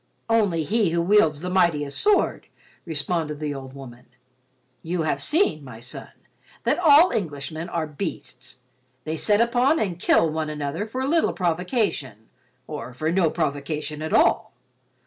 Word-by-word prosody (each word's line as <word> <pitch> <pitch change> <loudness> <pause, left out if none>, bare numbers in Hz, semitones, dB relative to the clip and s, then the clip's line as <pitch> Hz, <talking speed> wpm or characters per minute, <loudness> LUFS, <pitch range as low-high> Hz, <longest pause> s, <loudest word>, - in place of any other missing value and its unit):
"Only 200 -8 +2
he 210 +2 +1
who 170 +1 0
wields 170 -6 +3
the 180 - -4
mightiest 155 -6 +1
sword," 415 -1 +2 0.4
responded 155 -1 -2
the 150 -1 -3
old 135 -1 -8
woman. 125 -3 -12 0.7
"You 170 0 -2
have 155 - -1
seen, 305 - +1
my 125 -4 -10
son, 120 +1 -8 0.5
that - - +1
all 325 +1 +6
Englishmen 155 -2 -4
are 165 -2 -2
beasts. 150 -4 -7 0.4
They 155 +3 -3
set 205 +6 +2
upon 245 +6 +3
and 180 -5 -2
kill 165 - +3
one 155 0 -2
another 150 +6 -3
for 260 +4 -3
little 325 +3 +2
provocation 175 - -2 0.4
or 125 -5 -7
for 155 +5 -1
no 175 -2 +3
provocation 150 -1 -3
at 155 - -4
all. - - +3
160 Hz, 145 wpm, -24 LUFS, 145-205 Hz, 0.7 s, all